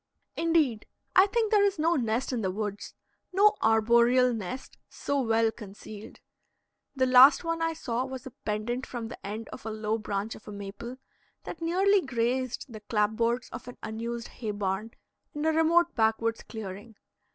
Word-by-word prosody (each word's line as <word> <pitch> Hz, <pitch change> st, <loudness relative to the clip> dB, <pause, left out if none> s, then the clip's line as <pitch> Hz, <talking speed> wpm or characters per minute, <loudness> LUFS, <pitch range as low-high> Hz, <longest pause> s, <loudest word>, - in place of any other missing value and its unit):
Indeed, 315 Hz, -10 st, +1 dB, 0.3 s
I 380 Hz, +2 st, +7 dB
think 440 Hz, +1 st, 0 dB
there 415 Hz, -2 st, +5 dB
is 400 Hz, -2 st, +2 dB
no 325 Hz, +2 st, +2 dB
nest 245 Hz, 0 st, -1 dB
in 240 Hz, -, -1 dB
the 190 Hz, -, 0 dB
woods 205 Hz, +1 st, -5 dB, 0.4 s
no 405 Hz, +3 st, +5 dB
arboreal 235 Hz, +3 st, +4 dB
nest 225 Hz, +4 st, -6 dB
so 285 Hz, -1 st, -2 dB
well 225 Hz, -2 st, +2 dB
concealed. 210 Hz, 0 st, -11 dB, 0.7 s
The 260 Hz, -1 st, +2 dB
last 255 Hz, +5 st, +7 dB
one 330 Hz, 0 st, -2 dB
I 330 Hz, 0 st, +1 dB
saw 245 Hz, -6 st, -2 dB
was 260 Hz, 0 st, -7 dB
a 260 Hz, -, -8 dB
pendent 225 Hz, +5 st, -3 dB
from 235 Hz, -2 st, -5 dB
the -, -, -10 dB
end 215 Hz, +3 st, -5 dB
of -, -, -9 dB
a 220 Hz, -, -4 dB
low 215 Hz, 0 st, -2 dB
branch 210 Hz, +1 st, -3 dB
of -, -, -14 dB
a -, -, -6 dB
maple, 205 Hz, +5 st, -7 dB, 0.5 s
that 335 Hz, -, -8 dB
nearly 380 Hz, +4 st, +3 dB
grazed 255 Hz, -2 st, -1 dB
the 225 Hz, -4 st, -9 dB
clapboards 230 Hz, +3 st, 0 dB
of -, -, -8 dB
an 245 Hz, -, -9 dB
unused 230 Hz, +2 st, -5 dB
hay 225 Hz, -4 st, -6 dB
barn 205 Hz, +2 st, -3 dB, 0.4 s
in 295 Hz, +1 st, -2 dB
a 320 Hz, -, +4 dB
remote 335 Hz, +2 st, +3 dB
backwoods 225 Hz, 0 st, +1 dB
clearing. 210 Hz, 0 st, -8 dB
235 Hz, 170 wpm, -28 LUFS, 220-280 Hz, 0.7 s, I